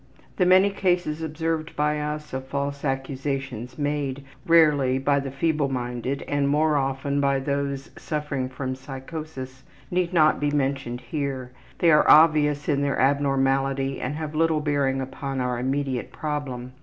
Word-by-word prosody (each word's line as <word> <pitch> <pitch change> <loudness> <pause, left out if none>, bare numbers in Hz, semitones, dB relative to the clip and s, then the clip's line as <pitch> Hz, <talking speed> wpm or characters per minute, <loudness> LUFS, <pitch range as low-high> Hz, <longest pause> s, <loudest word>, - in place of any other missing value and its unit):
The 180 - +3
many 190 +2 +6
cases 175 -5 0
observed 160 0 -3
by 150 0 +1
us 150 0 -4
of 130 0 -4
false 140 +1 -3
accusations 135 -2 -3
made, 145 -2 -2 0.2
rarely, 150 -6 +5
by 140 +1 +2
the 135 0 -4
feebleminded 135 -3 -1
and, 145 -1 +1
more 150 +1 +2
often, 140 +1 0
by 140 -1 +2
those 140 +1 -3
suffering 150 -4 -3
from 130 0 -4
a - - -3
psychosis, 135 0 -8 0.3
need 180 -1 0
not 155 -4 +4
be 145 - +1
mentioned 135 -4 -1
here 130 -1 -4 0.3
they 170 - +4
are 150 - +5
obvious 150 -2 +5
in 140 -2 +1
their 140 -1 0
abnormality 135 0 +1
and 140 +4 -3
have 155 -1 -5
little 160 0 +2
bearing 140 -3 0
upon 135 +1 -4
our 125 -1 -1
immediate 135 0 -2
problem. 135 -5 -4
140 Hz, 150 wpm, -25 LUFS, 135-150 Hz, 0.3 s, many